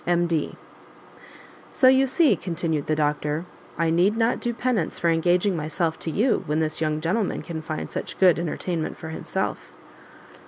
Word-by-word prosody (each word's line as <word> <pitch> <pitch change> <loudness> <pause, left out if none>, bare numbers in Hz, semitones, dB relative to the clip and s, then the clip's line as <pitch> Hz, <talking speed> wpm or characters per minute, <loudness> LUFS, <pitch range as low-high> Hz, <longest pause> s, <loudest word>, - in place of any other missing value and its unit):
M.D. 170 -3 +1 1.1
"So 260 - +3
you 265 +1 +5
see," 295 +4 +4
continued 165 -4 -2
the 155 - +1
doctor, 150 +1 -1 0.3
"I 165 0 +1
need 185 +6 +3
not 230 +1 +1
do 240 - -2
penance 235 -7 -1
for 170 - +2
engaging 175 +4 +2
myself 160 +1 -2
to - - -3
you, 220 - +1
when 150 +2 0
this 155 0 -1
young 155 -1 0
gentleman 190 +6 -1
can 165 -2 -5
find 155 0 -5
such - - -5
good 180 -3 +5
entertainment 170 0 -3
for 160 - -8
himself." 160 - -3
170 Hz, 160 wpm, -24 LUFS, 155-195 Hz, 1.1 s, you